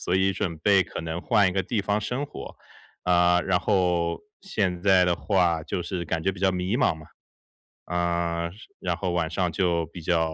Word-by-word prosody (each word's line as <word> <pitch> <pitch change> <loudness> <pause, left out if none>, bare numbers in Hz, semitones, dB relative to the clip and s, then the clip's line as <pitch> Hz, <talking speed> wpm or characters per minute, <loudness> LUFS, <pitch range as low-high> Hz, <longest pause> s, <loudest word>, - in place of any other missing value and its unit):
所 90 - -1
以 95 +1 +2
准 85 -3 -3
备 95 +3 +4
可 - - -7
能 80 +1 -4
换 105 -2 +3
一 - - -2
个 95 +1 0
地 110 +4 -1
方 100 +1 0
生 125 +7 -3
活。 - - -9 0.5
啊， 90 0 +4
然 90 -2 +1
后 90 -4 +1 0.2
现 95 - -2
在 95 -2 +5
的 90 -1 +2
话 85 -5 +1
就 90 - -3
是 90 -1 -4
感 80 0 -2
觉 95 - +2
比 95 - -11
较 95 -1 +3
迷 90 +4 -1
茫 125 - +2
嘛。 80 -1 -13 0.8
呃， 85 -1 -1 0.3
然 90 -2 -2
后 90 +1 -2
晚 85 -2 0
上 90 +1 -1
就 85 -1 +1
比 85 +2 -10
较 80 -1 +1
90 Hz, 215 characters per minute, -26 LUFS, 85-95 Hz, 0.8 s, 在